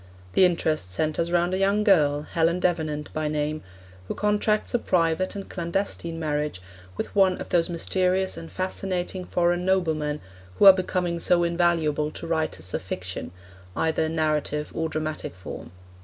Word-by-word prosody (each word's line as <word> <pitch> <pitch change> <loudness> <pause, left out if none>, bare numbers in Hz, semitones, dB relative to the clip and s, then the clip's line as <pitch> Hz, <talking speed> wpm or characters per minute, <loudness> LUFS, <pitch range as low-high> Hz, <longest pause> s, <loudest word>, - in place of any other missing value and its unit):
The 190 - +6
interest 155 - 0
centres 155 - -1
round 175 +1 +2
a 190 - 0
young 200 +2 +2
girl, 150 -8 +4
Helen 165 +3 +1
Davenant 155 -4 -1
by 155 -1 -1
name, 150 0 -1 0.5
who - - -3
contracts 210 0 +1
a 240 - +3
private 170 -1 +1
and 200 -1 -6
clandestine 170 -2 -3
marriage 150 - -2 0.4
with - - -4
one 190 -2 +4
of - - -7
those 170 -1 +2
mysterious 185 +2 +1
and 165 - -9
fascinating 185 -1 -2
foreign 175 0 +1
noblemen 160 -6 0 0.4
who - - +5
are 195 - +12
becoming 180 -2 -1
so 175 +1 +3
invaluable 170 -3 +1
to - - -8
writers 155 - -2
of - - -1
fiction, 90 -2 -6 0.4
either 160 0 +1
in 160 +1 -3
narrative 150 -1 0
or 160 0 -1
dramatic 155 - -4
form. 90 -2 -9
170 Hz, 155 wpm, -25 LUFS, 155-185 Hz, 0.5 s, are